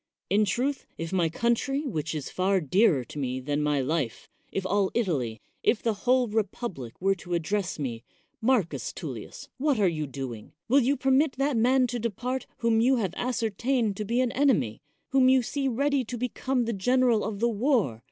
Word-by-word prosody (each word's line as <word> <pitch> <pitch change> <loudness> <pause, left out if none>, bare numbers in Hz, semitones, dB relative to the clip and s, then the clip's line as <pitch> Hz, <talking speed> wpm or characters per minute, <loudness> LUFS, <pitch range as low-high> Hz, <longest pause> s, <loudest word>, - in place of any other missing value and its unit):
In 210 +2 +4
truth, 255 +8 -1
if 165 +2 -5
my 175 -3 +2
country, 235 - 0
which 160 - -3
is 145 -3 -5
far 190 +1 +2
dearer 170 - +3
to 145 - -8
me 130 -2 -2
than 145 +3 -1
my 150 -2 +1
life 135 -3 -2
— - - -39
if 195 - -3
all 195 0 +2
Italy 140 - -1
— - - -45
if 225 - -5
the 230 - +2
whole 250 +4 +2
republic 205 - -3
were 195 +1 +3
to 175 -1 -4
address 185 +3 -1
me, 120 -6 -4 0.4
Marcus 225 -7 +1
Tullius, - - -7
what 285 -4 +2
are 200 - +4
you 155 -3 -1
doing? 130 -5 -7
will 265 +4 +5
you 275 +2 +2
permit 265 +3 +3
that 275 +1 0
man 255 +3 +4
to 245 0 -3
depart 245 +4 -3
whom 230 -1 +2
you 260 +3 +4
have 195 -8 -1
ascertained 235 -1 0
to 215 - -2
be 235 +4 +1
an 250 -2 +1
enemy? 160 - +1 0.3
whom 265 -1 +4
you 260 -1 +5
see 275 +3 -2
ready 275 +2 +1
to 240 +2 -5
become 250 +1 -1
the 230 - -1
general 245 +2 +2
of 210 -2 -4
the 235 - +3
war? 225 - +1
220 Hz, 195 wpm, -27 LUFS, 165-255 Hz, 0.4 s, will